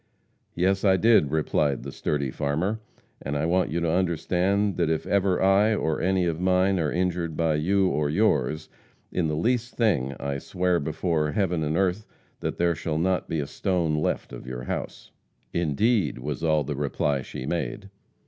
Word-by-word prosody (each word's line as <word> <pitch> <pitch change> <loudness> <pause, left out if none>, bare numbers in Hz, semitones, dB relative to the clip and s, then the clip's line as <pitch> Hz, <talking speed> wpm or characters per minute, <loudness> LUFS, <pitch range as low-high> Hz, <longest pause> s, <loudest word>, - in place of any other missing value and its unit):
"Yes, 95 +3 +1
I 95 -2 +4
did," 110 -9 +4
replied 75 -2 0
the - - -6
sturdy 70 -3 -2
farmer, 80 - -1 0.4
"and 70 +1 -3
I 70 - 0
want 90 +2 +1
you 85 - -1
to 85 -1 +1
understand 95 +3 +1
that 85 -3 +1
if 80 -1 -1
ever 95 -2 +1
I, 100 +3 +4
or 80 -6 -1
any 95 +1 +2
of 85 -1 -1
mine, 95 +1 +2
are 75 -3 0
injured 85 -2 -1
by 80 -2 +2
you 95 +6 +2
or 75 -4 0
yours, 75 - +1 0.4
in 90 -3 0
the 75 - -1
least 120 +8 0
thing, 75 - +1
I 70 0 -3
swear 90 +3 0
before 80 0 -1
heaven 90 -5 0
and 75 +2 -1
earth 95 +2 0 0.3
that - - -3
there 85 0 +2
shall 80 -1 -3
not 90 +2 0
be 80 - -1
a - - -3
stone 85 +1 -1
left 75 0 -1
of - - -9
your 60 -1 -5
house." - - -5 0.4
"Indeed!" 90 - +1
was 75 +5 -5
all 80 -2 +2
the 75 - -3
reply 70 0 -1
she 65 - -7
made. 90 +5 -3
85 Hz, 180 wpm, -26 LUFS, 75-95 Hz, 0.4 s, I